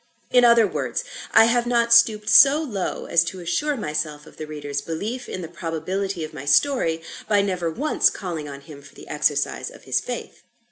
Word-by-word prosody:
In 245 -1 +5
other 235 -2 +6
words, - - -3 0.3
I - - +7
have 240 +1 +1
not 235 -1 +2
stooped 220 -2 +4
so 275 +6 +7
low 220 - -4
as 170 0 +3
to 185 +2 -6
assure 180 - -1
myself 150 -5 -4
of - - -17
the 155 - -7
reader's 145 -2 -5
belief 205 - -5
in 185 - -5
the - - -6
probability 175 +3 -4
of 155 0 -7
my 145 -3 -8
story, 165 - +2 0.3
by 205 -2 +3
never 180 -4 -2
once 285 - +1
calling 165 -6 -6
on 140 0 -9
him 140 0 -13
for 140 0 -17
the - - -13
exercise 145 -1 -1
of - - -16
his - - 0
faith. - - -7
180 Hz, 195 wpm, -22 LUFS, 155-235 Hz, 0.3 s, I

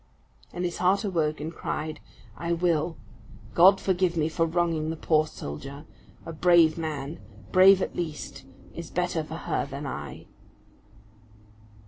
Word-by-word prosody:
And 180 - -3
his 175 - -3
heart 185 +2 +3
awoke 160 -6 0
and 155 +3 -5
cried, 155 -1 -4 0.4
"I 170 0 -2
will. 165 -1 0 0.6
God 190 +3 +7
forgive 180 -2 0
me 155 0 +1
for 165 +1 0
wronging 165 -2 0
the 160 - -2
poor 155 -1 +2
soldier! 140 - -8 0.4
A 165 - -6
brave 165 -1 +5
man, 155 -2 -4 0.3
brave 190 +1 +7
at - - -5
least, 155 -6 -5 0.3
is 170 -1 -7
better 175 -2 -1
for 155 +1 -8
her 165 - -2
than 140 +1 -6
I." 75 - -6
165 Hz, 140 wpm, -27 LUFS, 155-175 Hz, 0.6 s, God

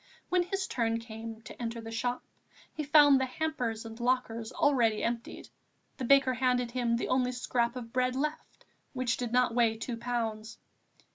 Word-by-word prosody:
When 360 0 +3
his 380 +2 -2
turn 230 -7 0
came 225 -1 -8
to - - -10
enter 230 0 -3
the 225 0 -8
shop, 245 +2 -2 0.5
he 310 - -4
found 290 -2 +6
the 260 - 0
hampers 250 -6 -3
and 225 +1 -9
lockers 240 -2 -1
already 235 -7 +2
emptied; 235 0 -4 0.5
the 255 - -3
baker 270 0 +5
handed 250 -1 +1
him 240 -2 0
the - - -3
only 255 -1 +2
scrap 245 -1 -1
of 230 -2 -7
bread 255 0 +1
left, 300 +3 -4 0.3
which 255 -2 0
did 245 -2 -3
not 250 -1 +3
weigh 230 -2 +2
two 230 +1 -4
pounds. 230 -2 -3
245 Hz, 170 wpm, -30 LUFS, 230-255 Hz, 0.5 s, found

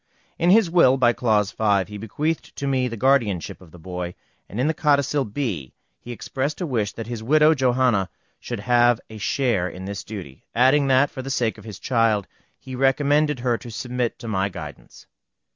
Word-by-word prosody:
In 170 - +3
his 210 +1 +6
will, 165 -6 +4
by 120 -2 +4
clause 105 -5 +1
5, 100 -3 +1
he 105 0 -8
bequeathed 150 +10 -3
to 140 - -4
me 130 -2 +1
the 115 -2 -6
guardianship 115 -10 +1
of 90 - -15
the 90 - -14
boy, 90 +1 -6 0.3
and 105 - -6
in 130 - +2
the 160 - +2
codicil 145 -2 +1
B 105 - -4 0.3
he 120 - -9
expressed 130 +6 -3
a 180 - -2
wish 115 -9 -1
that 115 - -6
his 115 0 -5
widow, 155 +6 +4
Johanna, 125 -7 +2 0.3
should 120 -4 -5
have 120 0 +3
a 110 - -9
share 105 -5 0
in 95 +2 -9
this 100 0 -5
duty, 90 -11 -9
adding 135 +4 +4
that, 135 +2 +3
for 130 - -6
the 135 - -7
sake 120 -5 -1
of - - -14
his 105 -4 -8
child, 115 -5 +1 0.3
he 130 - -10
recommended 145 +1 +2
her 120 -2 0
to 120 - -10
submit 125 +1 -3
to 115 - -9
my 100 -2 0
guidance. 75 -6 -10
120 Hz, 195 wpm, -23 LUFS, 105-135 Hz, 0.3 s, his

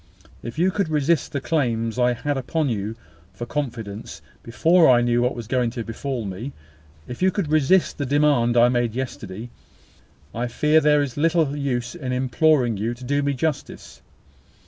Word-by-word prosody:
If 120 +4 -8
you 180 +3 +2
could 195 -3 -1
resist 150 0 +1
the 140 - -2
claims 120 -5 -1
I 125 0 +3
had 140 +5 -2
upon 140 +3 -1
you 110 -1 -3 0.4
for 120 - -6
confidence 115 - -5 0.2
before 165 +8 +3
I 120 -1 +5
knew 120 0 +2
what 125 +2 0
was 120 - -6
going 125 +1 0
to 115 - -2
befall 120 +1 -4
me 110 +8 -6 0.5
if 125 - -8
you 185 - +4
could 185 -5 -2
resist 155 +4 +2
the 140 - -1
demand 140 -4 +2
I 120 +1 +6
made 120 -2 0
yesterday, 120 -3 -6 0.8
I 120 +2 -2
fear 150 +6 +3
there 150 -1 +4
is 140 -2 -6
little 160 -2 +2
use 125 -4 -2
in 135 -7 -4
imploring 130 -1 +2
you 115 +4 -2
to 125 - -13
do 145 +3 0
me 140 -1 0
justice. 140 - -4
130 Hz, 175 wpm, -23 LUFS, 120-150 Hz, 0.8 s, I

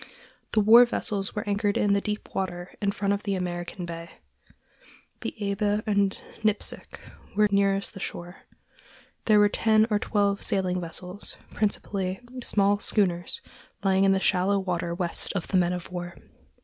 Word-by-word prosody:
The 215 - +4
war 225 +4 +9
vessels 205 -4 -2
were 210 - -3
anchored 205 0 +1
in 205 -1 +3
the 200 - +2
deep 210 +1 -5
water 175 -2 -3
in 200 -1 +1
front 200 0 0
of 200 - -2
the 200 -2 -1
American 175 0 -4
consulate. 170 0 -8 1.0
The - - -5 0.2
Eber 205 +1 0
and 200 -2 +1 0.3
Nipsic 215 -1 -1 0.4
were 210 0 +5
nearest 200 0 +1
the - - -9
shore. 175 0 -6 0.9
There 215 -1 +5
were 205 0 +6
ten 220 +1 +3
or 210 - +3
twelve 200 -2 +1
sailing 185 -2 0
vessels, 180 +3 -5 0.2
principally 195 -2 -1 0.2
small 205 -3 +2
schooners 175 -5 +1 0.4
lying 190 -1 +3
in 195 - +5
the 195 - +3
shallow 190 +1 +2
water 175 -3 -2
west 175 -2 -2
of 180 - -3
the 190 - +2
men 175 -1 +3
of 180 -1 -5
war. 175 -1 -5
195 Hz, 160 wpm, -26 LUFS, 180-205 Hz, 1.0 s, war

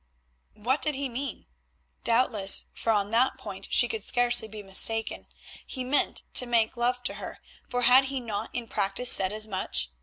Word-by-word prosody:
What 245 +7 -2
did 305 -2 -1
he 275 +1 -3
mean? 260 0 -7 0.6
Doubtless, 230 -5 +4
for 225 - -2
on 205 -1 -1
that 240 +3 +1
point 195 -2 -9
she 240 - +4
could 225 -2 -5
scarcely 240 +1 +1
be 215 -1 -10
mistaken, 220 +3 0 0.4
he 255 - -6
meant 265 +3 -1
to 250 - +4
make 230 -2 0
love 245 +1 -2
to 245 - -3
her, - - -8 0.3
for 245 0 -2
had 255 +3 +5
he 270 0 -4
not 220 -5 -5
in 240 -2 -6
practice 200 +5 0
said 190 0 +6
as 215 0 -2
much? 185 - -3
235 Hz, 180 wpm, -26 LUFS, 210-250 Hz, 0.6 s, said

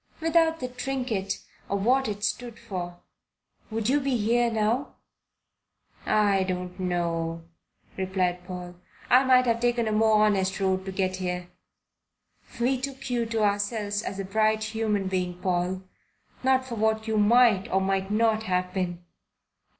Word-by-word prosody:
Without 325 0 +2
the 255 - -3
trinket 250 -6 -3 0.3
or 200 - 0
what 255 +6 +2
it 205 -1 -4
stood 235 +3 -2
for, 180 -6 -6 0.7
would 220 -1 -2
you 280 +4 +3
be 270 -3 0
here 235 +2 +2
now?" 225 +5 0 1.1
"I 205 -2 +3
don't 180 0 -3
know," 170 -2 -1 0.5
replied 185 -2 -1
Paul. 180 -1 -7 0.3
"I 255 +2 +7
might 255 -1 +5
have 230 -1 +1
taken 240 -1 +1
a - - 0
more 215 0 +4
honest 195 -2 +1
road 190 -1 0
to 190 - -4
get 185 -1 -1
here." 180 -1 -3 1.1
"We 250 +2 +1
took 275 -1 -5
you 235 -2 0
to 225 -1 0
ourselves 205 0 0
as 195 - -5
a 195 - -3
bright 215 +2 +1
human 215 -3 -1
being, 180 -1 -2
Paul 180 0 -1 0.6
not 260 0 +2
for 255 - -7
what 220 0 0
you 220 -1 +1
might 215 -2 +4
or 190 - +3
might 195 0 0
not 220 +1 +2
have 180 -3 -1
been. 175 -2 -3
210 Hz, 150 wpm, -26 LUFS, 185-235 Hz, 1.1 s, I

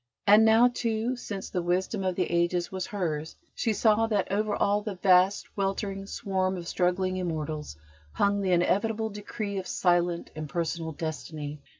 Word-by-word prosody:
And 210 +2 +7
now, 225 +2 +6
too, 235 0 -1
since 200 -5 -6
the 180 - -1
Wisdom 185 +4 -1
of 185 -1 0
the 185 - +1
Ages 175 +2 +1
was 185 -1 -3
hers, 160 -6 -3 0.2
she 230 - 0
saw 220 +1 +3
that 205 -4 0
over 210 +1 0
all 205 +1 +2
the 210 -2 -5
vast, 185 +1 +3
weltering 195 0 -2
swarm 190 -2 -1
of 170 -1 -7
struggling 185 +1 0
immortals, 155 - -4 0.4
hung 200 - +1
the 190 -2 0
inevitable 215 +5 +1
decree 205 0 -4
of 185 - -7
silent, 175 -1 +1
impersonal 160 +2 -3
destiny. 150 -2 -5
190 Hz, 160 wpm, -28 LUFS, 175-205 Hz, 0.4 s, And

